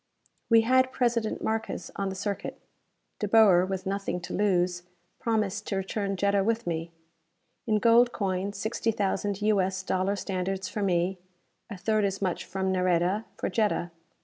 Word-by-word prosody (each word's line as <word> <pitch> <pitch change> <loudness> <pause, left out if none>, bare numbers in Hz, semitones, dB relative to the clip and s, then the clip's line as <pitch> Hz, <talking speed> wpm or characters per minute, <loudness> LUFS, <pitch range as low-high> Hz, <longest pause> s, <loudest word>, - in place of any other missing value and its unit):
We 230 -1 +7
had 260 +2 +3
President 235 -4 0
Markes 220 0 -3
on 195 -1 -2
the 190 - -5
circuit. 200 +1 -4 0.6
De 210 - -1
Boer, 195 -4 +6
with 190 0 -4
nothing 195 -1 -2
to 180 - -7
lose, 180 -3 +1 0.4
promised 215 -2 -1
to - - -1
return 195 +1 -2
Jetta 200 0 +2
with 230 +2 0
me. 165 -1 -3 0.8
In 215 -1 +3
gold 235 +2 +5
coin, 195 -2 -2
sixty 220 +3 -2
thousand 205 -1 -1
U. 210 -2 +3
S. 190 0 -2
dollar 190 +1 0
standards 190 0 -3
for 210 - -4
me; 180 -1 +1 0.5
a 205 - -6
third 215 +3 +1
as 195 -1 -1
much 185 -3 -2
from 190 0 -2
Nareda, 185 +3 +1
for - - -2
Jetta. 210 -5 0
195 Hz, 160 wpm, -28 LUFS, 185-215 Hz, 0.8 s, We